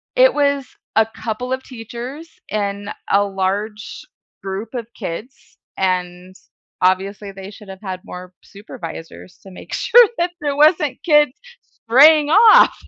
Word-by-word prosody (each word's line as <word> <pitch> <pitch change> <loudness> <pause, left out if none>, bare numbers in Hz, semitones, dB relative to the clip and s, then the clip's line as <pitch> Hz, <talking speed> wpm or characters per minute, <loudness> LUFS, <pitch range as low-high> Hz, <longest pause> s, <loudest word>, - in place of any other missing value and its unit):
It - - +5
was 280 -2 +1 0.3
a 220 - +5
couple 225 +3 -5
of 260 - -4
teachers 250 +6 -9 0.2
and 205 -1 -3 0.2
a 200 +1 +3
large 200 +2 -4 0.4
group 195 +5 -6
of 235 -3 -5
kids, 215 +7 -8 0.2
and, 180 0 -2 0.5
obviously, 195 +2 0
they 195 0 -10
should 210 -1 -14
have 190 +1 -10
had 185 -2 -6
more 180 -2 -10
supervisors 165 - -10
to 195 - -13
make 185 - -11
sure 485 -1 +5
that 345 +1 0
there 290 -1 -2
wasn't 300 -1 +2
kids 295 -5 +4 0.5
straying 295 +5 +6
off. 445 +7 +7
215 Hz, 135 wpm, -19 LUFS, 190-280 Hz, 0.5 s, off